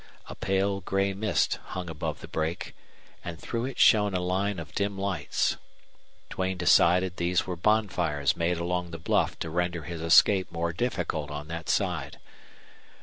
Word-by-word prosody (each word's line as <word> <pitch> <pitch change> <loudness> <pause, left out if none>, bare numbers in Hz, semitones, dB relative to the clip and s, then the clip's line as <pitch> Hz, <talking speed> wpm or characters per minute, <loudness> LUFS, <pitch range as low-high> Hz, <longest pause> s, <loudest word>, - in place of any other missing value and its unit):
A - - -7
pale 95 +1 0
gray 95 +1 0
mist 105 +2 0
hung 90 -1 -6
above 80 -2 -4
the - - -8
brake, 80 +1 -3 0.5
and 85 -1 -6
through 115 0 -3
it 135 - -6
shone 105 -3 +5
a - - +1
line 95 +3 -1
of 80 -3 -8
dim 100 0 -1
lights. 95 -7 -1 0.7
Duane 95 0 -2
decided 90 +1 +4
these 90 +1 +1
were 90 - -3
bonfires 90 -7 +1
made 85 +1 0
along 90 +1 -2
the 85 - -6
bluff 80 - 0
to 80 - -5
render 90 -1 -1
his 80 +2 -6
escape 95 +3 +5
more 85 0 -2
difficult 90 -8 -2
on 75 +1 -6
that 85 -1 -5
side. - - -1
90 Hz, 160 wpm, -27 LUFS, 85-95 Hz, 0.7 s, shone